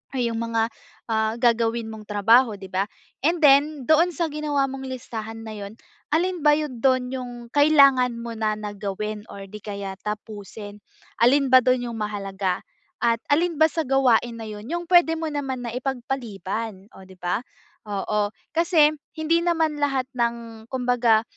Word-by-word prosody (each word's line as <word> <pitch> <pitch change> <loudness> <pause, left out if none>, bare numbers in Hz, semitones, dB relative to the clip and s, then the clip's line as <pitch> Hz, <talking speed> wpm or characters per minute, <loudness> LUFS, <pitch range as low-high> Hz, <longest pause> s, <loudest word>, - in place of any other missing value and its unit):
Ah, - - -1
'yung 235 -1 -1
mga, 230 -1 0 0.4
ah, 220 0 +1
gagawin 230 -1 +2
mong 215 -1 -10
trabaho 225 +3 +4
'di 190 - -9
ba? 190 +1 +1 0.4
And 335 +4 +2
then, 285 -1 +4
doon 330 +3 +5
sa 335 +3 0
ginawa 295 -2 0
mong 265 0 -6
listahan 225 -3 -6
na 215 - -6
'yun, 200 +1 -8 0.4
alin 355 +3 +1
ba 300 - +6
'yun 295 -5 -4
do'n 255 -2 +3
'yung 255 -2 -5 0.2
kailangan 275 -4 +5
mo 235 0 -6
na 215 -1 0
na 210 -1 -5
gawin? 210 +1 -4
Or 195 0 -9
di 210 +2 -9
kaya 200 -2 -5
tapusin? 210 -1 -7 0.4
Alin 275 +3 +5
ba 260 - +9
do'n 255 0 +2
yung - - -6
mahalaga? 195 -3 -2 0.4
At 230 -1 +3
alin 335 +3 +2
ba 315 - +7
sa 325 - -1
gawain 245 -3 +3
na - - -6
'yun 210 +1 -8
'yung 345 0 -2
puwede 345 -2 +6
mo 320 - -2
naman 270 -4 -3
na 235 - -4
ipagpaliban? 230 -6 -4
Oh, 190 - -12
'di 190 - -14
ba? 180 +3 -1 0.5
Oo, 205 +1 -1 0.2
kasi 325 -2 +4 0.2
hindi 320 +1 +2
naman 325 -3 0
lahat 275 -3 +1
ng 235 -2 -3
kumbaga 245 -3 +2
235 Hz, 170 wpm, -24 LUFS, 215-285 Hz, 0.5 s, ba